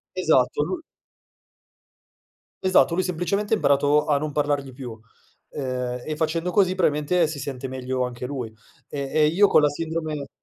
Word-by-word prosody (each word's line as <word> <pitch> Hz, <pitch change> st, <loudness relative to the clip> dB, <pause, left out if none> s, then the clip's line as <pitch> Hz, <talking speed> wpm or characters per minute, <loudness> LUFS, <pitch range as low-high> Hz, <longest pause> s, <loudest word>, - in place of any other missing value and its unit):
Esatto, -, -, +2 dB
lu 365 Hz, -3 st, -2 dB, 1.8 s
Esatto, 185 Hz, -2 st, +4 dB
lui 185 Hz, +1 st, +1 dB
semplicemente 185 Hz, +4 st, -1 dB
ha -, -, +6 dB
imparato 145 Hz, 0 st, +3 dB
a 145 Hz, -2 st, +3 dB
non 150 Hz, 0 st, -4 dB
parlargli 145 Hz, -2 st, -1 dB
più. 120 Hz, -4 st, -8 dB, 0.5 s
Ehm, 125 Hz, -2 st, -3 dB
e 155 Hz, -1 st, -4 dB
facendo 165 Hz, +3 st, -1 dB
così 185 Hz, -1 st, +3 dB
probabilmente 165 Hz, -1 st, +2 dB
si 155 Hz, -2 st, -5 dB
sente 135 Hz, -1 st, -5 dB
meglio 130 Hz, 0 st, -2 dB
anche 125 Hz, 0 st, -5 dB
lui. 125 Hz, -5 st, -5 dB, 0.4 s
Ehm, 140 Hz, -2 st, -4 dB
e 155 Hz, -1 st, +4 dB
io 190 Hz, +7 st, +4 dB
con 155 Hz, -, +4 dB
la 150 Hz, -, +5 dB
sindrome 155 Hz, -2 st, -4 dB
150 Hz, 155 wpm, -24 LUFS, 135-165 Hz, 1.8 s, ha